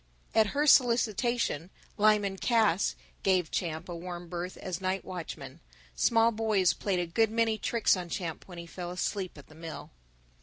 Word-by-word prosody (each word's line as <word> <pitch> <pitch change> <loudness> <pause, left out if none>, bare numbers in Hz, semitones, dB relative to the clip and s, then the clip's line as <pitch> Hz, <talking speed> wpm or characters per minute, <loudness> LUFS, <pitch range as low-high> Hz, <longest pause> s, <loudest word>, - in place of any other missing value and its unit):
At 220 -1 +5
her 295 - +3
solicitation 235 - +3 0.3
Lyman 205 -2 +3
Cass 215 -5 +2 0.3
gave 185 -4 +2
Champ 160 -3 -2
a 175 - -5
warm 175 0 -7
berth 180 +1 -5
as 185 -1 -5
night 190 +1 -1
watchman. 165 -5 -7 0.4
Small 230 0 +4
boys 215 -5 +2
played 195 -3 -1
a 175 - 0
good 220 +7 +2
many 225 -1 +1
tricks 235 -3 +2
on 180 -2 -5
Champ 170 -3 -4
when 175 -2 -10
he 170 - -7
fell 175 +1 -7
asleep 185 0 -3
at 145 - -12
the - - -17
mill. 160 0 -8
185 Hz, 165 wpm, -30 LUFS, 175-220 Hz, 0.4 s, At